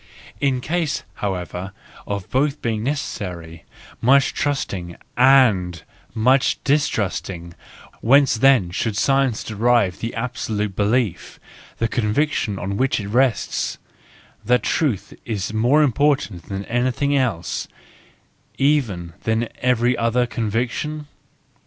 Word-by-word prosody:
In 135 -3 +1
case, 165 0 -1 0.2
however, 95 -1 -4 0.3
of 100 -2 -4
both 140 +2 +1
being 110 -2 -2
necessary, 90 - -4 0.4
much 135 +3 +4
trusting 95 -12 -2 0.2
and 110 - +4 0.3
much 130 +3 +3
distrust¬ 135 -12 0
ing, 85 -2 -8 0.5
whence 135 +3 +5
then 120 -6 +4
should 105 +3 -2
science 135 -2 +2
derive 110 -3 +1
the 115 - -4
abso¬ 120 +1 -4
lute 105 -2 -2
belief, 105 0 0 0.4
the 115 - +1
conviction 110 -1 0
on 95 +2 -3
which 130 +1 +1
it 100 -1 -5
rests, 125 -1 +1 0.7
that 125 +3 +2
truth 140 - -1
is 105 -2 -3
more 125 +8 +4
important 130 - 0
than 100 0 -4
anything 130 +4 0
else, 95 -10 -1 0.9
even 115 - +1
than 110 +1 0
every 125 0 +2
other 120 +2 +1
conviction 120 +7 -2
115 Hz, 115 wpm, -21 LUFS, 100-135 Hz, 0.9 s, whence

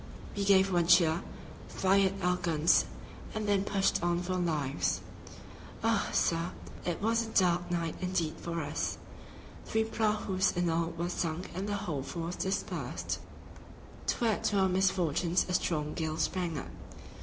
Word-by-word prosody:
We 200 - -1
gave 195 -1 +5
one 170 -1 +3
cheer, 170 -1 +5 0.5
fired 195 0 +2
our 180 0 +2
guns 165 -2 +3 0.5
and 215 -1 -2
then 200 -1 +3
pushed 195 -1 +1
on 175 0 +1
for 185 +1 -2
our 185 - 0
lives. 150 -6 0 0.8
"Ah! - - +2
sir, 85 +2 +1 0.3
it 175 +3 -3
was 230 +1 +3
a 230 - -5
dark 175 -3 +2
night 170 -2 -1
indeed 180 -4 0
for 170 -1 -3
us. 145 +2 -2 0.7
Three 220 0 +2
prahus 210 -4 0
in 175 -1 +2
all 165 0 +1
were 170 +1 -1
sunk 175 0 -3
and 190 +4 -3
the 205 - 0
whole 160 -8 -3
force 165 +5 -4
dispersed." 190 +1 -2 0.9
To 240 - +1
add 220 -3 +1
to 205 - +2
our 190 -1 +4
misfortunes 180 -2 +2
a 180 - -2
strong 150 -4 0
gale 160 -1 -2
sprang 170 -1 -1
up. - - -6
180 Hz, 155 wpm, -31 LUFS, 165-195 Hz, 0.9 s, gave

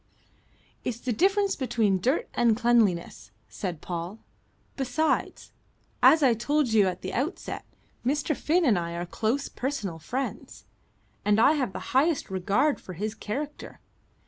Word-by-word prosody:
"It's 235 -2 -3
the 245 0 -2
difference 395 - +2
between 220 -7 +1
dirt 260 - +1
and 230 -2 +3
cleanliness," 220 - +1 0.2
said 175 -6 -5
Paul. 175 +3 -5 0.6
"Besides, 275 +4 -1 0.5
as 315 -1 +7
I 255 -3 +5
told 265 +2 0
you 205 -3 +5
at 180 -1 -4
the 185 - -4
outset, 280 +9 -3 0.4
Mr. 290 +4 0
Finn 335 +5 +1
and 215 -9 +4
I 170 0 -4
are 175 +1 -3
close 230 +10 -1
personal 215 - -4
friends, 255 +12 -5 0.6
and 210 +1 +3
I 235 - +6
have 275 -9 0
the - - -7
highest 280 - +2
regard 205 +11 +1
for 185 - -9
his 210 +5 -3
character. 280 +8 -6
235 Hz, 145 wpm, -27 LUFS, 195-285 Hz, 0.6 s, as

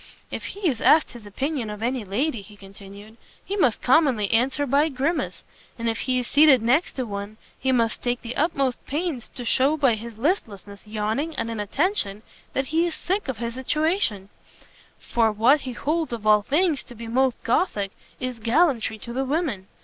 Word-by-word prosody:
"If - - -5
he 400 -1 -3
is 250 -7 -1
asked 310 -1 +5
his 230 -4 -11
opinion 265 +2 -3
of 210 +1 -6
any 250 0 -1
lady," 230 +5 -1
he 205 +1 -15
continued, 200 +2 -13 0.3
"he 400 - -3
must 260 - +1
commonly 255 -8 +3
answer 265 +5 +2
by 280 +3 +3
a - - -1
grimace; 280 +5 -2 0.3
and 230 0 -3
if 225 0 -1
he 255 0 0
is 250 - -1
seated 285 -3 +5
next 265 +9 +2
to 255 - -3
one, 205 0 -6 0.2
he 265 - +1
must 230 -3 +1
take 245 0 -2
the 235 +1 -5
utmost 275 -5 0
pains 300 -4 -3
to 245 - -8
shew 275 +6 +3
by 270 -5 +3
his 225 0 -7
listlessness, 215 - -3
yawning, 220 +9 -2
and 230 -3 -2
inattention, 220 - 0 0.3
that 270 0 -1
he 335 +2 +3
is 335 - -4
sick 390 +1 -2
of 265 -4 -3
his 235 +1 -4
situation; 260 - 0 0.7
for 225 -2 +1
what 240 +8 +4
he - - -5
holds 310 +2 -1
of 225 -2 -6
all 210 -1 +6
things 300 - +1
to 245 - -12
be 230 +1 -8
most 255 +1 +2
gothic, 210 - 0 0.3
is 255 -2 -4
gallantry 235 -2 +2
to 235 +2 -7
the 265 +2 -1
women. 270 - -2
245 Hz, 190 wpm, -24 LUFS, 220-295 Hz, 0.7 s, all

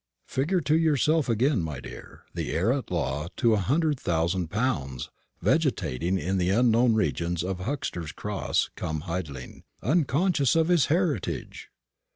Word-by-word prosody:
Figure 170 +8 0
to 150 +2 +2
yourself 155 -2 +2
again, 120 0 +2
my 75 -5 -4
dear, - - -11
the - - -3
heir 100 +9 +2
at 135 -2 -4
law 75 -3 -2
to 115 -2 +3
a 105 - +2
hundred 145 - +1
thousand 85 +1 0
pounds 75 - -2 0.3
vegetating 85 +10 +1
in 95 +1 -1
the 90 0 +1
unknown 115 +2 +4
regions 85 -5 0
of 95 0 -3
Huxter's 90 - -3
Cross 105 +2 -1
cum 80 -1 -3
Hidling, 80 -7 -6 0.2
unconscious 150 - +2
of 165 +1 +3
his 170 -7 +4
heritage! 165 - -1
110 Hz, 145 wpm, -27 LUFS, 85-145 Hz, 0.3 s, unknown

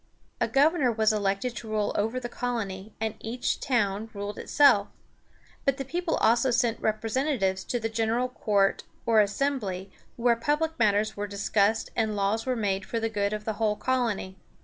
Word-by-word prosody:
A - - +2
governor 285 -2 +3
was 220 -1 +2
elected 205 +3 -1
to 230 - -7
rule 215 -1 0
over 225 +5 0
the 240 - -5
colony, 220 -5 -4
and 220 -1 -1
each 235 +3 -2
town 220 -4 0
ruled 205 +1 -5
itself. 255 -9 +4 0.8
But 275 -2 +1
the 270 - -4
people 340 +4 -1
also 240 +3 +3
sent 235 -2 +1
representatives 215 -3 0
to 245 - -1
the 225 - -1
General 225 +2 0
Court, 205 -5 +1 0.2
or 225 -2 +5
Assembly, 205 -4 -1 0.2
where 235 0 +3
public 300 +6 -1
matters 215 -1 +2
were 205 0 -3
discussed 200 +2 +1
and 220 -2 0
laws 205 +4 0
were 255 - +1
made 200 -4 -1
for 230 - -3
the 225 0 -1
good 205 -2 -1
of 210 0 -4
the 220 - -1
whole 210 -1 +2
colony. 230 -7 -1
220 Hz, 170 wpm, -27 LUFS, 205-245 Hz, 0.8 s, or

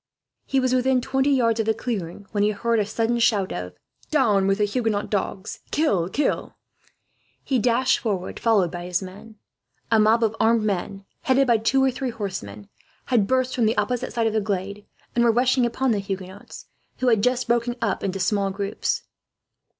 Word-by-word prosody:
He 270 - +1
was 255 -1 +1
within 255 0 +3
twenty 265 +2 0
yards 230 -5 +2
of 220 - 0
the 220 - +2
clearing 205 -5 -4
when 205 - 0
he 205 - +3
heard 230 +2 0
a 205 - 0
sudden 230 +2 0
shout 205 -5 +2
of: 90 0 -5 0.4
"Down 210 -10 +3
with 195 0 +2
the 210 - +2
Huguenot 215 -1 -1
dogs! 195 -1 -3
Kill! 200 - +1
Kill!" 290 +8 -1 0.9
He 260 -3 0
dashed 245 +2 +2
forward, 200 -7 -3
followed 205 -7 +2
by 175 0 -6
his 180 +1 -1
men. 200 +4 -11 0.6
A 225 - +5
mob 220 +2 +4
of 225 0 +1
armed 225 0 +3
men, 195 -1 -3 0.2
headed 270 -3 +3
by 235 -3 +3
two 265 +5 +2
or 265 - +3
three 260 +1 -3
horsemen, 145 - -6 0.5
had 210 -5 +3
burst 255 +1 +1
from 235 -3 +2
the 220 - 0
opposite 225 +4 -1
side 230 -1 0
of 220 - +1
the 220 - +1
glade 200 0 -4 0.3
and 235 - +3
were 235 - +5
rushing 250 +1 +2
upon 255 +2 0
the 210 - +1
Huguenots, 195 0 -7 0.3
who 255 - +1
had 225 -3 +3
just 250 +2 +1
broken 240 +1 +1
up 225 -5 -1
into 195 -1 -2
small 195 +1 +1
groups. 200 +1 -2
220 Hz, 190 wpm, -23 LUFS, 200-245 Hz, 0.9 s, A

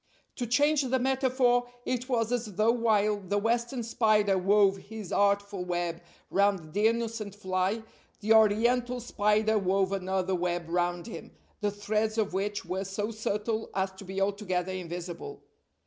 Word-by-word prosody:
To 245 - -2
change 290 +5 +3
the 260 -1 +1
metaphor, 255 -1 +2 0.2
it 255 +1 -2
was 230 -2 +1
as 230 -5 -2
though 215 +3 +4
while 215 -3 +2
the 200 +1 -2
Western 235 +3 0
spider 215 -3 +2
wove 195 +1 +4
his 210 -1 -9
artful 200 -1 +1
web 175 -1 -2 0.3
round 195 -6 +1
the 210 +2 +3
innocent 225 -3 -2
fly, 190 +2 -1 0.4
the 215 +1 +3
Oriental 235 +3 +3
spider 215 -1 +1
wove 190 0 +1
another 190 -1 -1
web 175 -1 -1
round 175 0 -1
him, 230 - -8 0.3
the 210 - 0
threads 215 +2 -1
of 210 -4 0
which 205 +2 -2
were 190 +1 -2
so 205 +3 -3
subtle 220 0 -2
as 190 0 0
to 190 +1 -12
be 190 +1 -5
altogether 195 -2 -1
invisible. 180 - -6
205 Hz, 150 wpm, -29 LUFS, 190-230 Hz, 0.4 s, though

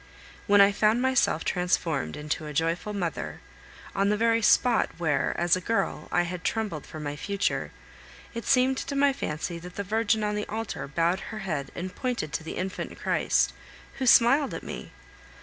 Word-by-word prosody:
When 205 0 +6
I 200 0 +7
found 215 +3 +3
myself 260 -10 +2
transformed 165 - 0
into 150 +1 -3
a 150 - -6
joyful 165 +7 0
mother, 185 -5 -3 0.5
on 200 0 +2
the 210 - +2
very 230 +1 +3
spot 235 +2 +4
where, 160 -4 0
as 175 +1 +4
a 185 - -3
girl, 225 +5 -1
I 175 - +3
had 180 +1 -5
trembled 210 -10 -2
for 155 - -8
my 145 -1 -4
future, 200 +6 -1 0.6
it 230 -2 -5
seemed 260 0 +4
to 280 - -4
my 280 0 +4
fancy 170 - -4
that 180 +1 -10
the 200 - -3
Virgin 220 +2 +1
on 210 0 0
the 210 0 -3
altar 220 -6 -4
bowed 170 +5 +1
her 220 - -6
head 145 -7 -2
and 180 +1 -5
pointed 245 - -3
to 160 - -2
the 160 - -6
infant 185 0 -4
Christ, - - +1 0.5
who 260 - 0
smiled 265 +5 +5
at - - -6
me! - - -7
200 Hz, 185 wpm, -27 LUFS, 170-225 Hz, 0.6 s, I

